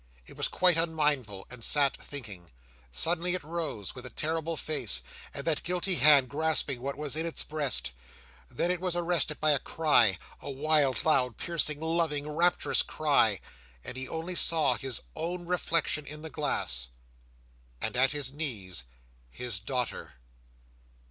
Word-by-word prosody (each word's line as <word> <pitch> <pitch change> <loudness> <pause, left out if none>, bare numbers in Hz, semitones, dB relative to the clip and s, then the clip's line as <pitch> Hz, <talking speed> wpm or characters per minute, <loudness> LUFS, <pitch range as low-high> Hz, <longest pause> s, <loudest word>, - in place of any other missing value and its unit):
It - - -14
was - - 0
quite 180 -2 +3
unmindful, 150 - 0
and 125 -2 -7
sat 140 +1 +3
thinking. 105 - -8 0.4
Suddenly 175 - +1
it 185 - -4
rose, 155 - -4
with 125 - -9
a 125 - -7
terrible 160 +5 -2
face, 125 - 0 0.3
and 140 - -7
that 160 -3 +1
guilty 180 +2 0
hand 140 -3 +6
grasping 145 -3 +1
what 140 +2 -4
was 150 -1 -1
in 160 +1 -1
its 165 - -5
breast. 145 - +2 0.6
Then 175 - -1
it 180 -1 -2
was 180 -2 -1
arrested 170 -3 0
by 155 - +3
a 145 - +3
cry—a 125 - +1
wild, 140 -2 +1
loud, 125 -7 +2
piercing, 155 -3 0
loving, 160 -3 0
rapturous 170 +4 +3
cry—and - - -1
he 130 0 -4
only 165 +5 -4
saw 160 -6 +3
his 130 -1 -5
own 175 +1 -4
reflection 165 -4 0
in 150 +1 -8
the 160 - -7
glass, 60 - -1 0.9
and - - -2
at 130 +2 +3
his 145 -3 -1
knees, 100 - -4 0.4
his 115 - -3
daughter! 125 +3 -3
150 Hz, 150 wpm, -29 LUFS, 125-165 Hz, 0.9 s, hand